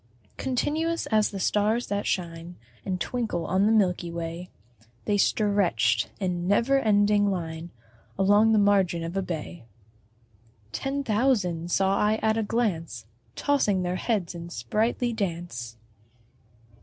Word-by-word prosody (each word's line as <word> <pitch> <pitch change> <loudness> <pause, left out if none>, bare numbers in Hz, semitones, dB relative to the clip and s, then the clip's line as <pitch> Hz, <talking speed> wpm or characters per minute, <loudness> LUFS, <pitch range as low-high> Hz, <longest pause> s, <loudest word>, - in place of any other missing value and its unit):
Continuous 310 +6 -1
as 215 -1 +3
the 195 - -6
stars 215 +5 +1
that 205 0 -2
shine 170 -1 -3 0.3
And 185 -2 -3
twinkle 225 -6 -2
on 190 +3 +2
the - - +3
milky 185 -5 +2
way, 170 +1 -5 0.6
They 205 -1 +1
stretch'd 170 - +2
in 180 -2 -2
never 235 +7 +3
ending 205 -3 +3
line 165 -3 -4 0.5
Along 205 +3 +4
the 220 - +4
margin 195 -5 +3
of 165 +2 -5
a 195 - +1
bay: 170 -3 -6 1.1
Ten 275 +1 -2
thousand 205 -8 +1
saw 195 +2 +2
I 210 +1 +3
at 220 0 +3
a 225 - 0
glance 190 - -2 0.3
Tossing 210 -10 +1
their 180 +1 -1
heads 200 -8 -1
in 170 0 -8
sprightly 230 +6 -1
dance. 170 - -4
195 Hz, 130 wpm, -26 LUFS, 175-220 Hz, 1.1 s, Along